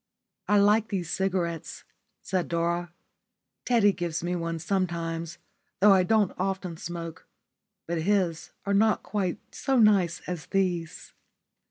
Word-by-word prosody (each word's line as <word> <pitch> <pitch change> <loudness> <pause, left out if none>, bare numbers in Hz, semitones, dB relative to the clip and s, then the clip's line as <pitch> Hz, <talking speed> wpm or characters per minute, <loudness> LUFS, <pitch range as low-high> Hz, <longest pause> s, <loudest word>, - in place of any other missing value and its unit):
"I 205 - +4
like 210 +2 +4
these 180 -6 -3
cigarettes," 175 -4 -2 0.4
said 185 -2 -1
Dora. 170 +1 -1 0.7
"Teddy 230 -5 +4
gives 170 -2 -3
me 175 +1 -1
one 165 -1 -2
sometimes, 170 -2 -2 0.4
though 205 +1 +7
I 190 - +5
don't 210 +1 +2
often 185 -2 -2
smoke, 165 0 -7 0.6
but 170 -1 -2
his 180 -3 0 0.2
are 200 - 0
not 215 +2 +3
quite 190 -4 -2 0.2
so 270 -1 0
nice 200 -6 +4
as 175 -4 -5
these." 180 -4 -2
180 Hz, 130 wpm, -27 LUFS, 170-200 Hz, 0.7 s, though